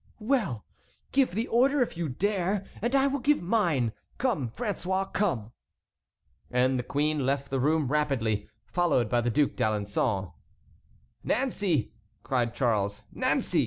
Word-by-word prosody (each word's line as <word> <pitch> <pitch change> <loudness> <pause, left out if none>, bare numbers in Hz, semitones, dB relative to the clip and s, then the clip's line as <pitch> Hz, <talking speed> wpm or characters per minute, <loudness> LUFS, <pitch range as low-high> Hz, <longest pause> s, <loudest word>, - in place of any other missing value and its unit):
"Well! 215 - 0 0.5
give 265 -9 +2
the 225 +3 -1
order, 265 +3 +4
if 235 - -6
you 165 -2 -2
dare, 195 +5 0 0.2
and 240 +5 0
I 270 0 +4
will 280 0 0
give 295 +3 +3
mine! 170 - +2 0.3
Come, 205 - 0
François, 195 - -2
come!" 130 - 0 1.0
And 125 +1 +2
the - - -2
queen 150 +2 0
left 140 +1 -1
the 135 - 0
room 150 +2 +2
rapidly, 125 -8 0 0.2
followed 155 -11 +1
by 120 +1 +2
the 120 - 0
Duc 145 +5 +2
d'Alençon. 100 -3 -1 0.9
"Nancey!" 200 - 0 0.3
cried 120 -3 0
Charles; 105 -5 0
"Nancey! - - +1
150 Hz, 135 wpm, -28 LUFS, -, 1.0 s, order